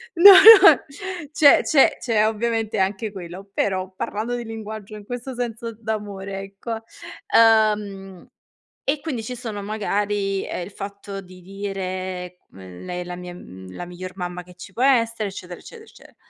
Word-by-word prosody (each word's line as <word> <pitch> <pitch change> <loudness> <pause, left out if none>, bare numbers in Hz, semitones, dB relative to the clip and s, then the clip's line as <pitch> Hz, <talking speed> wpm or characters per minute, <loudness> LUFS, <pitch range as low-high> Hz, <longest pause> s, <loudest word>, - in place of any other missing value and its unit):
No, 395 +4 +10
no, 395 0 +9 0.5
c'è 290 -2 +6
c'è 280 -3 +4
c'è 220 -3 +1
ovviamente 225 -1 -2
anche 200 +3 -1
quello, 185 +2 -9
però, 190 -1 -1
parlando 225 +6 -3
di 240 - -5
linguaggio 220 -2 -8
in 205 -1 -11
questo 245 +2 -6
senso 235 -1 -5
d'amore, 205 -3 -5
ecco. 220 +3 -7 0.5
Uhm, 210 -4 +2 0.6
e 280 +2 0
quindi 270 -8 -4
ci 250 +3 -6
sono 225 -4 -6
magari 205 -1 -2
ehm, 175 - -4
il 200 - -12
fatto 200 0 -8
di 180 -1 -15
dire, 185 -2 -5
mhmm: 95 - -12
"Lei 180 0 -5
è - - -4
la 175 0 -7
mia 180 0 -8
mhmm, 95 - -12
la 175 - -6
miglior 180 +1 -9
mamma 180 -1 -5
che 180 0 -17
ci 180 - -12
può 250 - -1
essere, 230 -5 +2
eccetera, 180 -2 -9
eccetera, 460 -2 -13
ecce" - - -19
205 Hz, 160 wpm, -22 LUFS, 185-230 Hz, 0.6 s, No